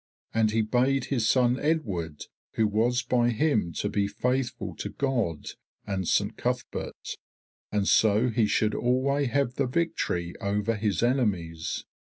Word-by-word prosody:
And 110 -1 +3
he 110 +1 +1
bade 130 +5 +1
his 120 -5 0
son 125 0 +3
Edward 100 - -1 0.3
who 110 - +2
was 115 +4 +1
by 120 -1 +2
him 115 - +1
to - - -2
be 100 -1 0
faithful 125 +5 -2
to - - -4
God 120 - -1 0.4
and 95 -3 -2
Saint - - +1
Cuthberht, - - -4 0.5
and 105 -1 0
so 110 +3 +4
he 110 -2 +2
should 105 0 +1
alway 135 +3 +1
have 135 -1 0
the 135 - +1
victory 125 - -1
over 105 +3 0
his 105 0 0
enemies. 95 - 0
115 Hz, 145 wpm, -27 LUFS, 100-130 Hz, 0.5 s, so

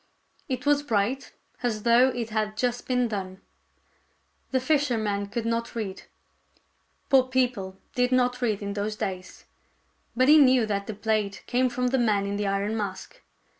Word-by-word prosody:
It 255 +1 -3
was 290 0 +3
bright, 240 0 -1 0.3
as 220 -4 -2
though 240 +2 +5
it 235 -3 -4
had 215 -1 -2
just 245 +1 -1
been 250 -1 +1
done. 190 -3 -5 1.1
The 260 - +1
fisherman 235 -8 0
could 230 +3 -4
not 230 +1 -2
read. 200 -4 -5 1.0
Poor 265 -2 +5
people 245 -7 -1 0.2
did 250 0 +1
not 250 0 +2
read 215 -4 0
in 200 0 -3
those 210 +1 -3
days. 185 -3 -6 0.7
But 255 +2 +3
he 305 +1 +8
knew 255 -4 +5
that 200 -2 -2
the 220 - -5
plate 210 -1 -1
came 250 +1 +1
from 250 +1 -1
the 265 +1 +1
man 210 -4 +2
in 200 0 -2
the 205 0 -1
iron 200 +2 -1
mask. 195 -3 -5
230 Hz, 165 wpm, -26 LUFS, 205-250 Hz, 1.1 s, he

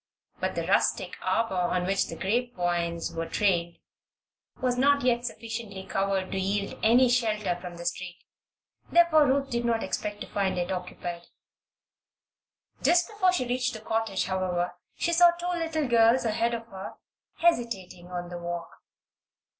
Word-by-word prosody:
But - - -2
the - - -2
rustic - - +1
arbor 225 -2 0
on 180 0 0
which 195 +1 +1
the - - -6
grape 240 +5 -1
vines 170 -1 -1
were 165 0 -3
trained 175 -4 +1 0.8
was 250 -1 +1
not 280 +2 +3
yet 240 -1 +2
sufficiently 225 -5 -6
covered 195 -1 -1
to 190 - -1
yield 200 +1 -2
any 245 +3 +5
shelter 215 -6 +1
from 175 -1 -8
the 170 - -8
street; 185 -1 -3 0.8
therefore 340 -3 +6
Ruth 275 +1 +1
did 235 0 0
not 230 -1 +1
expect 210 -1 -3
to - - -5
find 195 -2 -1
it 175 +1 -1
occupied. 175 -1 -5 1.5
Just 350 0 +3
before 405 -4 +2
she 355 -8 0
reached 250 +1 0
the - - -6
cottage, 220 -3 -1
however, 180 -2 -1 0.2
she 340 - 0
saw 350 +1 +7
two 345 0 -7
little 325 -4 -1
girls 235 +1 +4
ahead 230 +2 +1
of 230 0 -6
her, 190 -1 -8 0.4
hesitating 225 - 0
on 175 -1 -5
the 175 0 -6
walk. 170 0 -5
215 Hz, 155 wpm, -27 LUFS, 180-250 Hz, 1.5 s, saw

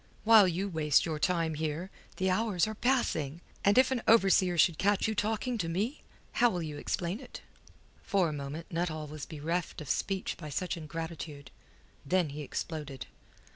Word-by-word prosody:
While 215 -3 +8
you 180 +3 -1
waste 155 -5 +2
your 160 -3 -3
time 165 -1 +1
here, 160 +4 -3 0.3
the 190 0 +1
hours 195 -2 +2
are 215 - -4
passing! 200 - 0 0.2
And 200 +3 +4
if 260 +1 +6
an 255 -3 0
overseer 195 -5 +5
should 165 0 +4
catch 200 +1 +2
you 220 - 0
talking 220 +3 -1
to 165 -4 -1
me? 210 - -2 0.3
How'll 210 -8 +2
you 150 -2 -5
explain 180 +4 -2
it?" 265 - -10 0.6
For 190 -3 +2
a 155 - -3
moment 145 +3 -6
Nuttall 165 -2 -2
was 150 -1 -7
bereft 165 +3 -3
of 150 -4 -3
speech 195 -1 -2
by 155 -3 -7
such 180 +6 -2
ingratitude. 160 -3 -7 0.5
Then 180 +1 +1
he 145 +2 -6
exploded. 150 -2 -5
170 Hz, 170 wpm, -31 LUFS, 155-200 Hz, 0.6 s, While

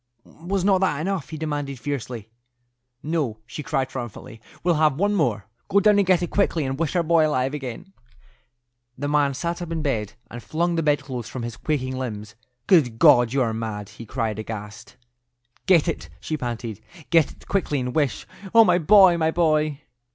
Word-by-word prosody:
"Was 180 +6 -4
not 195 -2 +3
that 180 -7 +1
enough?" 170 -4 -2
he 155 - -6
demanded, 145 -4 -4
fiercely. 120 -5 -5 0.7
"No," 150 -8 -1
she 115 +6 -7
cried, 135 -3 -1
triumphantly; 120 -3 -8 0.2
"we'll 175 0 +3
have 155 -3 +4
one 205 +4 +1
more. 120 - 0 0.2
Go 200 - +3
down 210 0 +4
and 200 - +2
get 180 -2 +3
it 175 - -4
quickly, 170 -6 +1
and 135 +1 -3
wish 165 +1 -1
our 175 - +2
boy 165 -1 +3
alive 135 -2 0
again." 150 +7 -7 1.0
The 145 +2 -3
man 145 -2 +2
sat 170 +4 -3
up 170 -1 -6
in 160 -2 -2
bed 110 -7 -2 0.2
and 120 - -7
flung 170 +6 -1
the 165 - 0
bedclothes 135 -6 -1
from 125 - -6
his 120 -1 -5
quaking 130 -3 -2
limbs. 105 -5 -5 0.3
"Good 135 - +3
God, 120 0 +6
you 135 0 +2
are 115 -2 -1
mad!" 110 -2 -5
he 110 +2 -11
cried, 110 -3 -2
aghast. 110 +2 -8 0.7
"Get 175 -4 +5
it," 165 - -3
she 155 - -3
panted; 120 -5 -5 0.3
"get 165 -3 +4
it - - -20
quickly, 170 -7 0
and 125 -1 -3
wish—Oh, 190 - +2
my 180 -2 +3
boy, 185 +1 +6
my 160 -1 +2
boy!" 155 -3 +1
145 Hz, 185 wpm, -23 LUFS, 120-170 Hz, 1.0 s, God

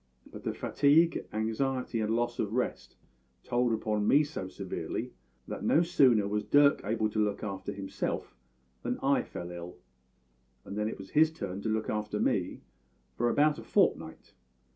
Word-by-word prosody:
But - - -9
the - - -2
fatigue, 155 +4 +3
anxiety, 115 +3 -1
and 110 +1 0
loss 120 0 -1
of 105 0 -1
rest 125 +1 -2 0.5
told 120 0 +1
upon 110 -2 0
me 145 +2 +6
so 145 -10 -5
severely - - -5 0.3
that - - -6
no 165 - +4
sooner 130 - +4
was 105 +1 -1
Dirk 145 0 +4
able 110 +1 0
to 110 0 +1
look 105 0 -2
after 100 -2 -4
himself 95 -1 -4 0.5
than - - -2
I - - +3
fell 85 0 -7
ill; 85 0 -8 0.9
and 100 - -7
then 105 0 0
it - - -6
was 95 0 -11
his 160 +1 +5
turn 100 -10 -5
to 110 - -2
look 110 0 -1
after 105 0 -2
me - - 0 0.5
for 120 0 +1
about 150 +3 +3
a - - -9
fortnight. - - 0
110 Hz, 165 wpm, -30 LUFS, 105-135 Hz, 0.9 s, me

